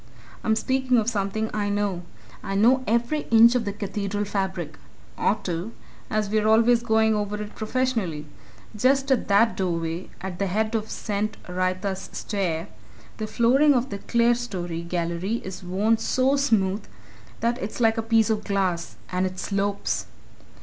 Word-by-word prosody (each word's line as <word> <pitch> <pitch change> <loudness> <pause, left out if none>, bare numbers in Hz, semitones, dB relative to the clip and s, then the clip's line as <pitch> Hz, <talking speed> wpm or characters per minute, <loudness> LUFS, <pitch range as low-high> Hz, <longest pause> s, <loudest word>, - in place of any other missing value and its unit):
I'm 220 - +2
speaking 260 +2 +1
of 220 -2 +1
something 215 +1 -2
I 205 -1 -1
know. 205 -3 -1 0.4
I 195 -1 -4
know 245 +6 +4
every 235 +7 0
inch 230 +1 +7
of 245 -3 0
the 200 - -1
Cathedral 205 0 -3
fabric 190 -2 -3 0.4
ought 215 - 0
to, 180 +5 -3 0.4
as 215 -1 0
we're 215 +1 +1
always 230 +2 +5
going 220 -1 +3
over 210 0 -2
it, 210 0 -6
professionally. 220 -9 -1 0.5
Just 270 +5 +2
at 265 - +2
that 220 +3 +4
doorway, 170 -1 -2
at 180 -1 -6
the 200 - +1
head 215 +4 0
of 220 -1 -1
St. 210 0 -3
Wrytha's 185 +2 -2
Stair, 185 -4 -2 0.5
the 215 - -3
flooring 265 +6 +4
of 250 0 0
the 200 - -4
clerestory 235 -8 0
gallery 170 +4 -2
is 185 -1 -6
worn 205 +5 +1
so 260 +4 +2
smooth 215 -8 +1 0.6
that 235 +1 0
it's 200 +5 -5
like 225 -1 +3
a - - +1
piece 225 0 +3
of 215 -1 -1
glass 185 -4 -1 0.2
and 185 +1 +1
it 185 0 -8
slopes! 200 +1 -1
210 Hz, 155 wpm, -25 LUFS, 190-230 Hz, 0.6 s, inch